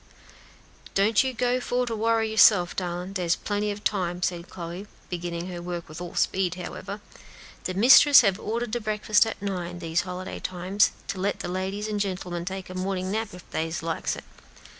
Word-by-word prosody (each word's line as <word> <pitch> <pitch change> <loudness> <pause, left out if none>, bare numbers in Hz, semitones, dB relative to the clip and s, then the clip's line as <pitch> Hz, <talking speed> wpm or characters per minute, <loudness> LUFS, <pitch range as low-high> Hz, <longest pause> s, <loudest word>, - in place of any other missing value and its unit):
"Don't 205 +4 +4
you 260 - -1
go 250 +1 +1
for 250 0 0
to 230 -2 -3
worry 225 0 +1
yourself, 205 -5 +5
darlin'; 180 +1 -3
dere's 175 -3 +1
plenty 205 0 -2
ob 205 0 -7
time," 180 -3 -1
said 175 -1 -2
Chloe, 175 +2 -7 0.2
beginning 175 -1 -3
her 175 -1 -6
work 175 -1 -5
with 155 +3 -9
all 175 -1 -7
speed, 185 -2 +1
however; 195 +3 -6 0.6
"de 185 - -2
mistress 265 +6 +8
had 200 -3 +1
ordered 230 +2 -3
de 240 +1 -1
breakfast 215 +1 +3
at 225 - -5
nine, 180 -3 -3
dese 165 -1 0
holiday 185 0 -6
times, 185 +3 +1 0.2
to 190 - -4
let 200 +2 0
de - - -5
ladies 190 +3 -3
an' 210 -1 -2
gen'lemen 180 -3 -3
take 190 0 -5
a - - -6
mornin' 185 0 -2
nap 220 +2 -1
if 180 - -13
dey 160 +1 -2
likes 165 -1 -2
it." - - -9
190 Hz, 185 wpm, -26 LUFS, 175-210 Hz, 0.6 s, mistress